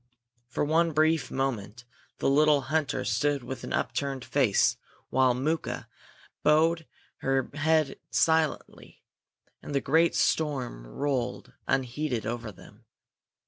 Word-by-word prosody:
For 125 - -1
one 165 +2 +2
brief 155 -2 +2
moment 120 -4 -3 0.3
the - - -1
little 145 +1 +4
hunter 155 0 -1
stood 145 -2 0
with 130 0 -6
upturned 135 -3 -2
face, - - +2 0.3
while 130 -2 +3
Mooka 155 +6 -2 0.5
bowed 160 +2 +3 0.3
her 135 -1 -1
head 155 -1 +1
silently, 160 -1 0 0.6
and 145 - -6
the - - +4
great 160 +5 +2
storm 130 - 0
rolled 130 - -3
unheeded 130 -2 -1
over 115 0 -4
them. 95 - -17
140 Hz, 110 wpm, -28 LUFS, 125-155 Hz, 0.6 s, little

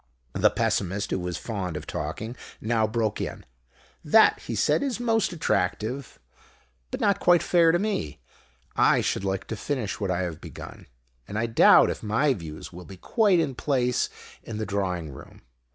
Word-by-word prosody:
The - - +4
Pessimist, 100 +1 -1
who - - 0
was 90 -2 -3
fond 95 -8 -4
of 75 - -7
talking, 95 +11 -5 0.2
now 110 0 +1
broke 110 -1 -1
in. - - -5 0.6
"That," - - +5
he - - -5
said, - - +2
"is 265 -5 -2
most 225 -5 +1
attractive, 120 - -2 0.7
but - - -4
not 200 -1 +2
quite 175 -1 +4
fair 170 -2 +4
to 175 - +3
me. 175 - -2 0.6
I - - +4
should - - -1
like 95 -1 -2
to 110 - -5
finish 120 -1 -3
what 100 -3 -2
I 90 0 0
have 85 -4 -4
begun. - - -10 0.4
And 105 - -5
I 115 - +1
doubt 115 -1 +6
if - - -6
my 115 +7 +2
views 80 -5 -8
will 90 +1 -10
be 95 - -11
quite 205 - +2
in 150 -5 0
place 125 -2 0 0.3
in 110 - -7
the 110 - -2
drawing 90 -6 -2
room. 65 - -13
110 Hz, 175 wpm, -26 LUFS, 90-145 Hz, 0.7 s, doubt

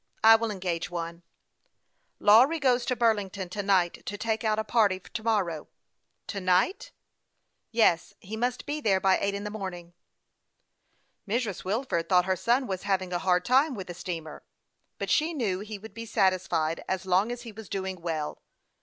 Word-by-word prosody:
I 225 0 +9
will 225 0 0
engage 180 -5 -3
one." 170 -1 -5 0.5
" - - -47
Lawry 245 +10 +6
goes 255 -4 +2
to 250 - +1
Burlington 205 -5 0
to 205 +3 -3
night 190 -3 +1
to 205 - -4
take 220 +1 -1
out 215 -1 +1
a 220 - 0
party 210 -4 +2
to 220 +4 -7
morrow." 190 -9 0 0.3
" - - -50
To 200 - -3
night? 185 - +1 0.3
" - - -50
" - - -51
Yes; 170 -5 +3
he 210 +4 -7
must 245 +2 -2
be 295 +1 -3
there 195 -7 +3
by 190 0 +3
eight 200 0 -1
in 200 - -4
the 210 - -4
morning." 180 -5 -6 1.3
Mrs. 220 -2 -2
Wilford 190 -5 -1
thought 180 -1 +4
her 190 0 +1
son 240 +8 +1
was 190 -5 -3
having 190 -2 -1
a 175 - 0
hard 180 -1 +2
time 270 +3 +3
with 190 -3 -6
the 175 - -7
steamer; 165 -3 -6 0.6
but - - -3
she 320 +2 +2
knew 205 -9 -1
he 210 +1 -6
would 205 0 -12
be 230 +1 -7
satisfied 185 -6 +1
as 190 -1 -2
long 190 +5 +2
as 245 0 -6
he 230 - -8
was 215 -1 -11
doing 190 -2 -4
well. 160 -3 -3
Mr. - - -38
200 Hz, 195 wpm, -28 LUFS, 180-225 Hz, 1.3 s, I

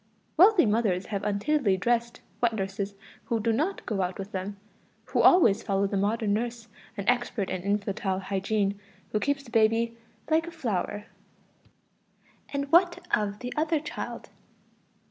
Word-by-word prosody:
Wealthy 375 - +6
mothers 210 -4 +1
have 200 - -1
untidily 210 +1 +1
dressed 235 +3 0 0.2
wet 235 -1 +3
nurses 195 0 -3 0.3
who 230 - 0
do 225 +1 +1
not 320 - -1
go 210 -4 -1
out 180 0 -2
with 195 +1 -7
them, 195 +2 -4 0.5
who - - +1
always 280 - +6
follow 200 -1 0
the 200 - -2
modern 205 +1 +1
nurse, 235 +1 -3 0.3
an 200 - -5
expert 240 -5 0
in 185 - -2
infantile 200 0 -1
hygiene, 200 +1 -1 0.3
who 215 - +1
keeps 285 +3 -1
the 235 - -14
baby 225 +1 +2 0.4
"like 325 +1 +3
a - - -6
flower." 210 - -3 1.5
And 280 0 -3
what 350 0 +4
of 205 -1 -3
the 250 0 -4
other 315 +1 +1
child?... 300 - -6
220 Hz, 150 wpm, -27 LUFS, 200-250 Hz, 1.5 s, Wealthy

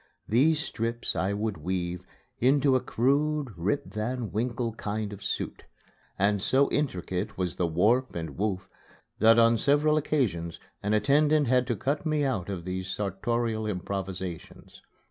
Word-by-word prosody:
These 150 +8 +3
strips 115 -4 -2
I 95 +2 0
would 105 -1 -2
weave 90 +2 -3 0.4
into 135 +1 +4
a - - +4
crude 140 +3 +1
Rip 95 +11 -1
Van 115 +1 -3
Winkle 115 +1 -1
kind 105 -1 -3
of 100 - -10
suit; - - -3 0.5
and 100 0 +2
so 135 +6 +3
intricate 95 -8 -2
was 90 -2 -2
the 90 - +1
warp 110 +11 +2
and 80 -4 -5
woof 100 -2 -2 0.5
that 115 +2 +6
on 115 0 +5
several 150 +2 +3
occasions 100 - -1 0.2
an 105 +1 +1
attendant 145 +7 +3
had 125 0 +3
to 120 - 0
cut 140 +8 -1
me 155 -2 +1
out 110 -10 -1
of 90 -4 -5
these 95 0 -3
sartorial 110 +3 -1
improvisations. 95 -3 -5
110 Hz, 145 wpm, -28 LUFS, 95-130 Hz, 0.5 s, that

